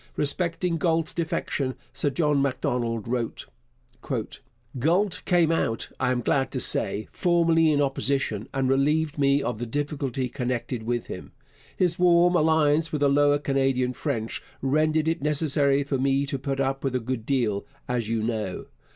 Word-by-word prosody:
Respecting 165 +3 0
Galt's 165 -2 +1
defection 145 -5 -2 0.2
Sir 145 - 0
John 145 0 +1
Macdonald 125 -5 -1
wrote: 120 -1 -3 1.3
Galt 175 - +1
came 175 -3 +3
out, 115 -8 -1
I 125 - +1
am 125 -1 0
glad 135 +2 +1
to - - -1
say, 105 - 0
formally 165 -2 +3
in 145 - +2
opposition 135 -5 -1
and 135 -1 0
relieved 150 +3 +1
me 140 0 +3
of 120 -3 -3
the 120 - -4
difficulty 135 -1 -2
connected 125 -1 -3
with 120 +1 -2
him. - - -8 0.4
His 180 -1 +1
warm 175 0 +5
alliance 160 -1 +3
with 150 - -2
the 140 - +4
Lower 145 +1 +4
Canadian 135 -3 0
French 115 -2 -3 0.2
rendered 155 +3 +1
it 165 0 0
necessary 145 -1 +2
for 140 -1 -2
me 135 +1 +2
to 140 -1 -3
put 135 0 -3
up 135 0 -1
with 135 -2 -1
a - - +2
good 120 -1 -4
deal, 115 -6 0 0.2
as 120 -3 -1
you 115 -1 0
know. 110 -5 -3
140 Hz, 160 wpm, -25 LUFS, 125-155 Hz, 1.3 s, warm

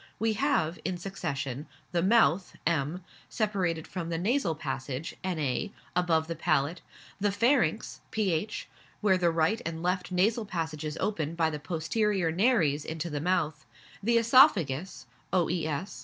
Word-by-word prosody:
We 225 0 +1
have, 200 - +1
in 185 -1 -2
succession, 140 -7 -4 0.2
the 175 -1 +1
mouth 195 -3 +3
(M.), 165 +2 0 0.3
separated 185 -7 -1
from 170 -3 -5
the 165 - -1
nasal 195 - +1
passage 135 0 -4
(Na.) 160 -2 -1 0.3
above 170 -3 +2
the 165 +1 -4
palate; 155 +1 0 0.4
the 205 0 +2
pharynx 220 - +1
(ph.), 205 -1 -1 0.3
where 190 -3 +3
the 175 -1 +3
right 165 +7 +1
and 165 0 -4
left 180 +1 -1
nasal 215 +5 +2
passages 160 -4 -3
open 165 -6 -1
by 160 -1 +2
the 150 - -4
posterior 175 +3 0
nares 165 - +2
into 160 +1 -4
the 145 -1 -2
mouth; 155 -3 0 0.4
the 235 +3 +3
oesophagus 190 - +4 0.3
(oes.) 170 -1 -1
170 Hz, 140 wpm, -29 LUFS, 155-200 Hz, 0.4 s, oesophagus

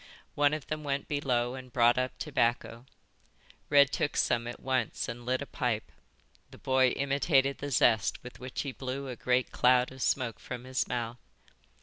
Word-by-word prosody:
One 145 +1 +3
of 155 - -7
them 155 0 -4
went 140 -1 -2
below 125 -5 0
and 130 -1 -9
brought 120 +1 +4
up 130 0 -2
tobacco. 120 -3 -1 0.8
Red 140 -1 +6
took 150 - -1
some 120 0 +1
at 120 - -6
once 130 -4 -1
and 120 +1 -7
lit 130 +2 0
a - - -8
pipe. 120 -6 -2 0.6
The - - -14
boy 130 0 +3
imitated 140 +1 +1
the 145 - -4
zest 115 -4 +2
with 125 - -10
which 130 0 -4
he 140 - -4
blew 130 +1 -5
a 125 - -5
great 125 +2 0
cloud 125 0 +3
of 130 0 -11
smoke 125 -4 0
from 125 -1 -7
his 130 0 -1
mouth. 120 -1 -3
130 Hz, 180 wpm, -30 LUFS, 120-140 Hz, 0.8 s, Red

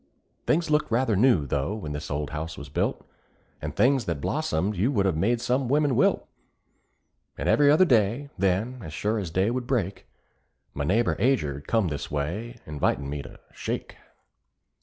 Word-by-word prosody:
Things 165 0 +2
looked 150 0 +2
rather 115 -1 +2
new, 100 - +4
though, 70 +8 -1
when 95 -9 -6
this 75 +1 -5
old 75 +1 -3
house 80 +2 -5
was 70 -1 -8
built; - - -2 0.5
And 75 0 -5
things 130 -2 +3
that 85 -4 -2
blossomed 85 +8 -1
you 105 +9 +1
would've 100 - +1
made 115 +9 +1
some 125 +1 0
women 145 -1 +2
wilt; - - +2 1.1
And - - -3
every 145 -1 +5
other 155 +6 +6
day, 120 - +2
then, 100 +7 0
as 75 - -8
sure 105 +6 -1
as 95 -5 -4
day 95 +6 +1
would 125 0 -3
break, 100 -8 -2 0.7
My 70 - -2
neighbor 110 +8 +2
Ager 75 - +1
come 110 -6 +2
this 75 -1 -4
way, 85 +12 -3
invitin' 70 -2 -1
me 75 -1 -3
to - - -12
"shake." - - -5
100 Hz, 170 wpm, -26 LUFS, 75-125 Hz, 1.1 s, other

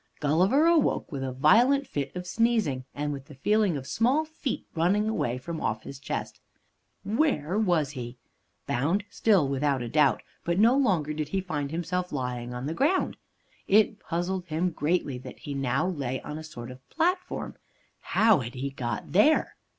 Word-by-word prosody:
Gulliver 185 - +3
awoke 335 - +2
with 135 -3 -4
a 130 - -2
violent 235 - +4
fit 140 - -4
of 180 0 -5
sneezing, 215 - +1
and 145 0 -2
with 135 -1 -7
the 145 - -13
feeling 205 +3 +2
of 130 - -7
small 250 - +2
feet 315 -4 -4
running 190 +6 +2
away 125 - -1
from 160 +5 -6
off 110 0 -2
his 140 - -9
chest. - - -5 0.6
Where 205 - 0
was 170 -9 +2
he? 125 -3 -7 0.5
Bound 165 +11 0
still, 195 -10 +3
without 135 -1 0
doubt, 135 -8 +3 0.2
but 170 +1 0
no 230 +5 +5
longer 180 - +1
did 155 -1 -3
he 190 +6 -1
find 150 -7 -3
himself 175 +3 -2
lying 125 -3 -3
on 125 +1 -5
the 155 - -2
ground. 310 - +1 0.5
It 210 +1 +4
puzzled 175 +2 -2
him 165 +3 0
greatly 150 -5 -1
that - - -10
now 140 +4 0
he - - -5
lay 130 -3 -2
on 150 - -6
a - - -8
sort 130 -6 -8
of 130 +1 -15
platform. 360 +3 -1 0.5
How 220 -5 +3
had 120 -1 -6
he 135 +2 -3
got 120 -2 -4
there? 215 - +4
160 Hz, 175 wpm, -27 LUFS, 135-210 Hz, 0.6 s, no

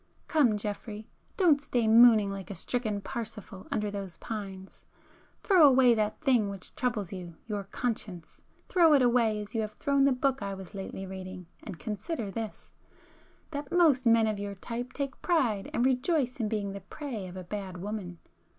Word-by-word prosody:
Come 260 -10 +3
Geoffrey, 210 +1 -6 0.3
don't 320 -7 +4
stay 240 -5 0
mooning 225 -2 +7
like 195 -1 -7
a 200 - -5
stricken 215 +1 -2
Parsifal 210 -4 -7
under 210 -1 -1
those 195 -4 -6
[p - - -17
311] 205 -4 -4
pines,—throw 365 - -1
away 255 -2 +6
that 215 -1 -1
thing 250 -8 +3
which 195 -2 -9
troubles 220 -7 -2
you, 175 -3 -7
your 205 -3 -4
conscience,—throw 230 - -1
it 270 - +4
away 235 -3 +3
as 205 - -12
you 225 - 0
have 215 0 -4
thrown 280 +4 +1
the 275 - +4
book 265 0 0
I 200 -1 -3
was 190 +1 -10
lately 195 -1 -6
reading, 185 -1 -8 0.2
and 190 -6 -7
consider 210 - -4
this,—that 260 +6 -10
most 300 -8 +4
men 230 -1 +5
of 215 -2 -1
your 200 0 -4
type 240 +5 -5
take 275 -1 -4
pride 245 - +1
and 240 - +1
rejoice 260 0 +1
in 220 -3 0
being 205 -2 -2
the 200 0 -7
prey 225 -2 -6
of 180 +1 -9
a 185 - -6
bad 190 0 -6
woman! 190 -2 -5
215 Hz, 175 wpm, -29 LUFS, 195-250 Hz, 0.3 s, mooning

